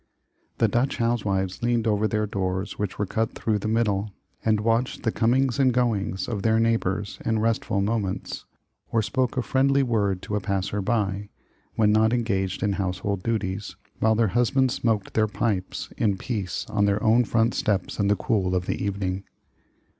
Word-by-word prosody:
The -, -, +3 dB
Dutch 125 Hz, +3 st, 0 dB
housewives 100 Hz, -6 st, 0 dB
leaned 120 Hz, -1 st, +1 dB
over 110 Hz, -1 st, +2 dB
their 105 Hz, 0 st, 0 dB
doors 95 Hz, 0 st, -3 dB
which 105 Hz, -3 st, -2 dB
were 105 Hz, -, 0 dB
cut 110 Hz, +3 st, -1 dB
through 110 Hz, -2 st, 0 dB
the 105 Hz, -, -3 dB
middle, 110 Hz, -2 st, +1 dB, 0.3 s
and 110 Hz, -1 st, +2 dB
watched 115 Hz, +3 st, 0 dB
the 115 Hz, -, +1 dB
comings 125 Hz, +4 st, +2 dB
and 130 Hz, -2 st, +5 dB
goings 110 Hz, -6 st, 0 dB
of 105 Hz, -4 st, -3 dB
their 110 Hz, +1 st, +3 dB
neighbors 105 Hz, -3 st, 0 dB
in 110 Hz, -1 st, +1 dB
restful 110 Hz, -2 st, 0 dB
moments, 100 Hz, -2 st, -2 dB, 0.5 s
or 115 Hz, -1 st, +2 dB
spoke 130 Hz, +3 st, -1 dB
a 125 Hz, -, +1 dB
friendly 135 Hz, +2 st, +3 dB
word 100 Hz, -6 st, 0 dB
to 105 Hz, -, -3 dB
a -, -, +1 dB
passer 100 Hz, +1 st, -2 dB
by, 100 Hz, -1 st, -1 dB, 0.5 s
when 105 Hz, -2 st, +4 dB
not 110 Hz, +2 st, +4 dB
engaged 100 Hz, -6 st, -1 dB
in 100 Hz, -2 st, +1 dB
household 95 Hz, 0 st, -2 dB
duties, 105 Hz, -2 st, -2 dB, 0.2 s
while 110 Hz, 0 st, +3 dB
their 110 Hz, -1 st, +2 dB
husbands 125 Hz, +3 st, +2 dB
smoked 110 Hz, -4 st, -1 dB
their 110 Hz, -1 st, +3 dB
pipes 105 Hz, -3 st, -2 dB
in 100 Hz, -4 st, +1 dB
peace 100 Hz, -4 st, -3 dB
on 100 Hz, -1 st, +1 dB
their 100 Hz, +1 st, +1 dB
own 115 Hz, +2 st, +5 dB
front 115 Hz, +1 st, +1 dB
stoops 100 Hz, 0 st, -1 dB
in 100 Hz, -, +2 dB
the 105 Hz, -, +4 dB
cool 95 Hz, -1 st, 0 dB
of 90 Hz, 0 st, 0 dB
the -, -, -2 dB
evening. 95 Hz, -1 st, -2 dB
105 Hz, 175 wpm, -25 LUFS, 100-115 Hz, 0.5 s, and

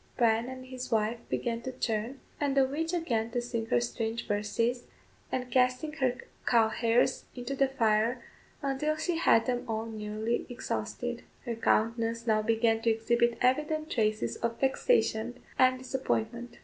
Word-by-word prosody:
Bryan 230 Hz, 0 st, +3 dB
and 260 Hz, 0 st, -8 dB
his 255 Hz, -1 st, -6 dB
wife 220 Hz, +1 st, +1 dB
began 235 Hz, -1 st, -1 dB
to 260 Hz, -, -4 dB
churn, 230 Hz, +4 st, -2 dB, 0.2 s
and 280 Hz, -2 st, 0 dB
the 270 Hz, -, +6 dB
witch 315 Hz, +5 st, -2 dB
again 245 Hz, -11 st, 0 dB
to 245 Hz, -, +1 dB
sing 235 Hz, -2 st, -3 dB
her 120 Hz, -, +3 dB
strange 220 Hz, -, -3 dB
verses, 230 Hz, +3 st, 0 dB, 0.5 s
and 250 Hz, -1 st, -2 dB
casting 255 Hz, +5 st, +2 dB
her 260 Hz, -5 st, 0 dB, 0.3 s
cow 230 Hz, -2 st, +5 dB
hairs 235 Hz, +3 st, +2 dB
into 250 Hz, +2 st, -4 dB
the 275 Hz, 0 st, +3 dB
fire 230 Hz, -1 st, +2 dB, 0.4 s
until 280 Hz, +3 st, 0 dB
she 330 Hz, +2 st, -1 dB
had 225 Hz, -8 st, +4 dB
them 245 Hz, -1 st, -1 dB
all 220 Hz, -1 st, -2 dB
nearly 220 Hz, +1 st, -3 dB
exhausted. 245 Hz, 0 st, -3 dB, 0.2 s
Her 240 Hz, -, -2 dB
countenance 230 Hz, +1 st, +1 dB
now 215 Hz, -2 st, +3 dB
began 225 Hz, 0 st, +2 dB
to 230 Hz, -, +2 dB
exhibit 235 Hz, +1 st, +2 dB
evident 300 Hz, +5 st, +1 dB
traces 215 Hz, -2 st, 0 dB
of 230 Hz, 0 st, -2 dB
vexation 250 Hz, -, +1 dB, 0.2 s
and 255 Hz, 0 st, +5 dB
disappointment. 240 Hz, -2 st, -2 dB
240 Hz, 155 wpm, -30 LUFS, 225-260 Hz, 0.5 s, the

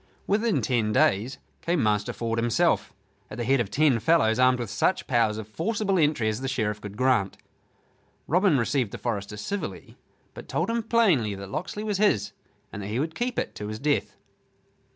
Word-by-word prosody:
Within 215 Hz, +1 st, +1 dB
ten 115 Hz, -4 st, +1 dB
days 105 Hz, +5 st, +2 dB, 0.2 s
came 170 Hz, -5 st, 0 dB
Master 105 Hz, -1 st, +1 dB
Ford 115 Hz, -1 st, -2 dB
himself, 115 Hz, 0 st, +1 dB, 0.4 s
at -, -, -8 dB
the 120 Hz, -, -2 dB
head 135 Hz, +3 st, +2 dB
of 115 Hz, -5 st, -1 dB
ten 145 Hz, -4 st, +3 dB
fellows, 115 Hz, -3 st, +3 dB
armed 125 Hz, 0 st, +5 dB
with 120 Hz, -4 st, -5 dB
such 190 Hz, -, +1 dB
powers 115 Hz, -5 st, +1 dB
of 110 Hz, -2 st, -6 dB
forcible 195 Hz, -, -1 dB
entry 145 Hz, -7 st, +2 dB
as 110 Hz, +3 st, -1 dB
the 135 Hz, -, -2 dB
Sheriff 110 Hz, -5 st, -2 dB
could 105 Hz, 0 st, -8 dB
grant. 125 Hz, -6 st, +1 dB, 0.9 s
Robin 180 Hz, -2 st, +3 dB
received 125 Hz, -1 st, 0 dB
the -, -, -7 dB
forester 105 Hz, -3 st, -4 dB
civilly, 200 Hz, -, -5 dB, 0.3 s
but -, -, -10 dB
told -, -, -1 dB
him 235 Hz, 0 st, 0 dB
plainly 190 Hz, -, +2 dB
that 100 Hz, 0 st, -9 dB
Locksley 185 Hz, -, -4 dB
was 210 Hz, -3 st, -2 dB
his 110 Hz, -, +2 dB, 0.4 s
and 105 Hz, -, -5 dB
that 100 Hz, -, -5 dB
he 110 Hz, +4 st, -2 dB
would 160 Hz, +3 st, -2 dB
keep 240 Hz, +6 st, -3 dB
it -, -, -2 dB
to 105 Hz, -, -6 dB
his 110 Hz, 0 st, -5 dB
death. 145 Hz, +4 st, 0 dB
125 Hz, 190 wpm, -26 LUFS, 105-170 Hz, 0.9 s, armed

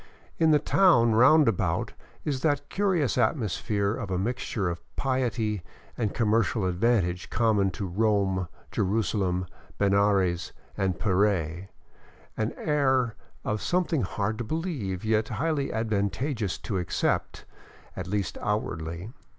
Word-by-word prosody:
In 160 Hz, -, +4 dB
the 150 Hz, -, +6 dB
town 145 Hz, -, +4 dB
roundabout 125 Hz, -, +4 dB, 0.3 s
is 140 Hz, -4 st, -1 dB
that 145 Hz, -2 st, 0 dB
curious 180 Hz, -11 st, +1 dB
atmosphere 105 Hz, -, 0 dB
of 115 Hz, -4 st, -5 dB
a 95 Hz, -, -1 dB
mixture 110 Hz, -1 st, -2 dB
of 85 Hz, -1 st, -3 dB
piety 120 Hz, -6 st, 0 dB, 0.3 s
and 110 Hz, -4 st, -1 dB
commercial 110 Hz, -2 st, +1 dB
advantage 90 Hz, -2 st, +1 dB
common 110 Hz, -4 st, +2 dB
to 100 Hz, +2 st, -5 dB
Rome, 95 Hz, -1 st, +1 dB, 0.2 s
Jerusalem, 95 Hz, -3 st, 0 dB, 0.3 s
Benares, 100 Hz, -4 st, +2 dB, 0.2 s
and 95 Hz, -2 st, -1 dB
Puree, 95 Hz, -3 st, +1 dB, 0.7 s
an 110 Hz, +1 st, -1 dB
air 130 Hz, -6 st, +1 dB, 0.3 s
of 105 Hz, 0 st, -1 dB
something 175 Hz, -4 st, +1 dB
hard 105 Hz, +3 st, -2 dB
to -, -, -1 dB
believe, 120 Hz, -, -3 dB
yet 110 Hz, 0 st, +2 dB
highly 145 Hz, -2 st, -1 dB
advantageous 110 Hz, +1 st, -1 dB
to 95 Hz, -4 st, -3 dB
accept, 90 Hz, -, -1 dB, 0.5 s
at 90 Hz, -1 st, -5 dB
least 100 Hz, -1 st, -2 dB
outwardly. 85 Hz, -2 st, -3 dB
110 Hz, 120 wpm, -27 LUFS, 95-125 Hz, 0.7 s, the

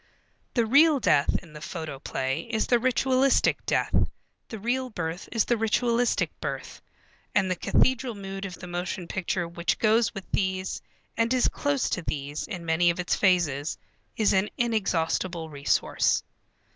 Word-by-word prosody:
The 235 Hz, -2 st, +3 dB
real 285 Hz, +5 st, +5 dB
death 150 Hz, -, +3 dB
in 165 Hz, -3 st, -15 dB
the 150 Hz, -, -10 dB
photoplay 140 Hz, -5 st, -4 dB
is 220 Hz, -, 0 dB
the 240 Hz, -, +3 dB
ritualistic 260 Hz, +2 st, +2 dB
death, -, -, +1 dB, 0.6 s
the 225 Hz, -, -6 dB
real 250 Hz, +5 st, -1 dB
birth 175 Hz, -4 st, -5 dB
is 225 Hz, -3 st, +2 dB
the 240 Hz, -, +1 dB
ritualistic 235 Hz, +2 st, +1 dB
birth, -, -, -5 dB, 0.5 s
and 190 Hz, -2 st, +3 dB
the -, -, +1 dB
cathedral 255 Hz, +5 st, +1 dB
mood 195 Hz, -1 st, -6 dB
of 185 Hz, -3 st, -6 dB
the 180 Hz, -, -10 dB
motion 175 Hz, 0 st, -4 dB
picture 180 Hz, -1 st, -2 dB
which 170 Hz, 0 st, -1 dB
goes 225 Hz, +1 st, +3 dB
with 195 Hz, -, -6 dB
these 190 Hz, -1 st, -1 dB, 0.3 s
and 230 Hz, +1 st, +1 dB
is 255 Hz, -1 st, +3 dB
close 285 Hz, -3 st, 0 dB
to 185 Hz, -, -1 dB
these 145 Hz, -2 st, -4 dB
in 180 Hz, -6 st, -6 dB
many 165 Hz, +2 st, +3 dB
of 170 Hz, -, -1 dB
its 180 Hz, -, 0 dB
phases, 170 Hz, -7 st, +1 dB, 0.4 s
is 215 Hz, -3 st, +3 dB
an 190 Hz, +2 st, +2 dB
inexhaustible 180 Hz, -7 st, 0 dB
resource. 140 Hz, -1 st, +1 dB
190 Hz, 155 wpm, -27 LUFS, 170-235 Hz, 0.6 s, real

